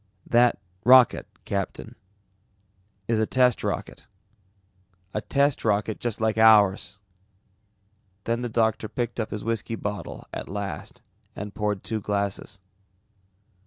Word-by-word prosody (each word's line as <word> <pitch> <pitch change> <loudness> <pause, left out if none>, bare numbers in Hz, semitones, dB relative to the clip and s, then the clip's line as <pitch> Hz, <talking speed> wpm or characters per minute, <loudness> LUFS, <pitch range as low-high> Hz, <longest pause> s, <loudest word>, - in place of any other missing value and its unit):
"That 120 -1 +3 0.2
rocket, 125 +1 +6 0.2
Captain, 100 -1 -4 1.1
is 115 -1 +1
a 110 - +1
test 125 -2 +3
rocket. - - -4 1.1
A 105 - -1
test 140 +3 +1
rocket 105 0 0
just 120 -3 -2
like 110 -1 +1
ours!" 105 -3 +5 1.3
Then 115 +3 -1
the 120 - -3
doctor 110 -1 0
picked 120 -1 -3
up 110 - -2
his 105 - -5
whiskey 115 0 -2
bottle 105 -2 -5
at - - -6
last 100 0 -6 0.3
and 105 0 -6
poured 105 -2 -2
two 110 -2 -3
glasses. 100 -1 -2
110 Hz, 120 wpm, -25 LUFS, 105-115 Hz, 1.3 s, rocket